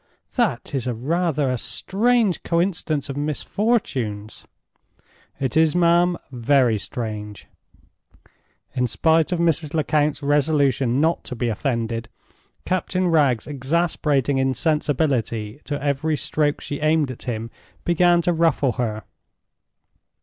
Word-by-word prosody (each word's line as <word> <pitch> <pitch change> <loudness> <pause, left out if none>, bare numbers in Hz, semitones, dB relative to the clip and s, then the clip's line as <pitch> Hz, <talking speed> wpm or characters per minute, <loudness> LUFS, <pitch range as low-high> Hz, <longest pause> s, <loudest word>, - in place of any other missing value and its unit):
"That - - 0
is 130 -3 -2
rather 145 +3 0
a 125 - -2
strange 220 - +1
coincidence 170 -4 -1
of 140 - -5
misfortunes." 145 - -2 0.9
"It 135 +2 -2
is, 160 0 +4
ma'am. 175 0 +3
Very 125 -2 +2
strange." 105 -3 -6 1.3
In 125 -1 0
spite 160 - +2
of 180 - +1
Mrs. 165 -2 0
Lecount's 150 -1 +1
resolution 140 -3 +2
not 160 +3 +1
to 125 - -5
be 120 0 -1
offended, 115 -2 -2 0.6
Captain 185 0 0
Wragge's 140 -8 +2
exasperating 145 -1 0
insensibility 135 -4 0
to 145 -1 -3
every 145 +2 0
stroke 150 0 0
she 145 - -5
aimed 155 -2 +2
at 125 - -10
him 115 0 -4 0.3
began 175 0 +3
to 175 - +2
ruffle 160 -5 +2
her. 110 -2 -3
145 Hz, 115 wpm, -22 LUFS, 125-165 Hz, 1.3 s, is